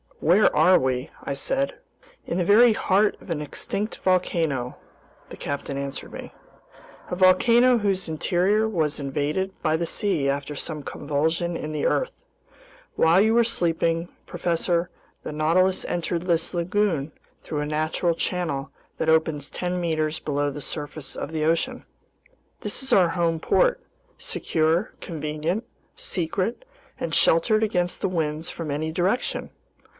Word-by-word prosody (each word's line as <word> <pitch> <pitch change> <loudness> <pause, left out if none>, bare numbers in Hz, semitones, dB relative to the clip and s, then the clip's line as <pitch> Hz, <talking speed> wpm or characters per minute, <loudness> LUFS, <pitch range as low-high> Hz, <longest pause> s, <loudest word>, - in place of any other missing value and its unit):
"Where 185 +6 +4
are 185 0 +6
we?" 130 0 -1
I - - -2
said. 270 - -1 0.5
"In 170 - -2
the - - +2
very 225 +4 +7
heart 205 +1 +2
of - - -14
an 160 -3 -2
extinct 200 +8 -4
volcano," 165 -8 0 0.5
the - - -9
captain 140 -1 -4
answered 140 0 -5
me, - - -8 0.8
"a - - -2
volcano 235 +7 +5
whose 195 -4 0
interior 185 +7 +1
was 160 -8 -1
invaded 145 +7 -1
by 155 +1 +2
the 170 - -1
sea 185 -10 0
after 140 +1 -2
some 150 +1 -5
convulsion 160 +5 -1
in 155 -1 -4
the 150 -1 -2
earth. - - +1 0.8
While 165 +4 +5
you 220 +2 +3
were 235 - +6
sleeping, 170 -5 0 0.2
professor, 175 0 0 0.3
the - - -5
Nautilus 170 +5 +2
entered 170 0 -2
this 170 -1 0
lagoon 170 -4 0 0.3
through 150 - -4
a - - -1
natural 155 +3 0
channel 155 -6 -2 0.3
that 160 - 0
opens 160 -3 +2
ten 180 0 -2
meters 160 -2 -1
below 145 -1 -1
the 145 - -7
surface 145 -1 -6
of 145 - -5
the 155 -1 -1
ocean. 165 +1 0 0.8
This - - -3
is 265 -1 -1
our 180 -5 +5
home 165 -1 0
port, - - +2 0.3
secure, 165 +6 0
convenient, 155 +5 -3 0.3
secret, 200 - -2 0.3
and - - -3
sheltered 215 +7 +4
against 180 -4 -1
winds 160 -3 -1
from 165 -3 -5
any 155 +2 -2
direction! 185 +9 -1
165 Hz, 140 wpm, -24 LUFS, 155-185 Hz, 0.8 s, very